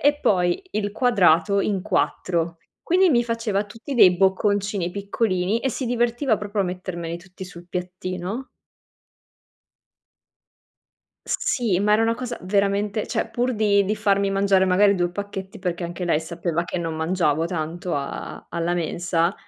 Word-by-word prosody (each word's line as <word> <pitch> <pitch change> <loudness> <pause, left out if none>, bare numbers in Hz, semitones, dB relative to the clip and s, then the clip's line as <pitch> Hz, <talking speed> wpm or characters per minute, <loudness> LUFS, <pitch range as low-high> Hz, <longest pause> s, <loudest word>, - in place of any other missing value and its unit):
e 290 +1 +3
poi 180 - +2
il 205 -1 -2
quadrato 200 -6 +3
in 195 -2 0
4, 170 -2 -1 0.3
quindi 365 0 +4
mi 240 -3 +3
faceva 230 -3 -1
tutti 230 +7 -8
dei 185 -6 +6
bocconcini 195 -1 +1
piccolini, 200 0 0
e 265 - -1
si 260 +1 -3
divertiva 240 0 +1
proprio 205 -1 -1
a - - -2
mettermeli 175 -2 -5
tutti 185 +1 -11
sul 175 -1 -12
piattino. 185 +6 -4 2.8
S - - 0
sì, 240 - +1
ma 210 +1 +3
era 215 +1 +4
una 230 0 +2
cosa 245 0 -5
veramente 200 +2 0
cioè, - - -2
pur 245 +1 -1
di 205 -2 +3
di 210 +2 -1
farmi 200 -1 +2
mangiare 195 -1 +3
magari 200 +2 +4
2 175 -1 0
pacchetti, 195 0 -6
perché 180 -2 -3
anche 175 +1 -4
lei 165 -3 +2
sapeva 170 0 -2
che 185 - -4
non 165 -2 -3
mangiavo 160 -1 +1
tanto 170 +1 -3
a 140 -1 -5
alla 170 +1 -1
mensa, 170 +1 0
195 Hz, 150 wpm, -23 LUFS, 175-215 Hz, 2.8 s, dei